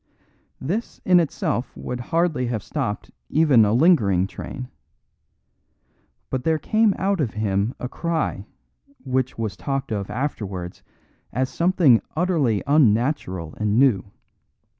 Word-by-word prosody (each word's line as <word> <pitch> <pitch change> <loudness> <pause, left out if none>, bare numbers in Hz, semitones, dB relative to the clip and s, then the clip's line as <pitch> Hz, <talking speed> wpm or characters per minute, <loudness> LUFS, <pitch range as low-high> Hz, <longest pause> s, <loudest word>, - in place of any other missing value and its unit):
This 195 - -3
in 180 -1 +6
itself 160 - -2
would 125 - -5
hardly 160 -1 0
have 115 -4 -3
stopped 125 -9 -4 0.2
even 150 -7 +5
a 105 - +2
lingering 115 - +4
train. 125 +5 -7 1.6
But 130 -1 -2
there 160 +1 +2
came 215 +6 +2
out 195 -2 0
of 120 -8 -2
him 105 +1 0
a 125 - -3
cry 160 - -2 0.6
which 130 -1 -1
was 110 -3 -3
talked 135 0 -3
of 100 -2 -3
afterwards 100 -10 -4 0.5
as 130 +2 -1
something 170 -9 +3
utterly 155 - +1
unnatural 115 - +1
and 105 0 +1
new. 120 -8 +3
130 Hz, 120 wpm, -23 LUFS, 105-160 Hz, 1.6 s, in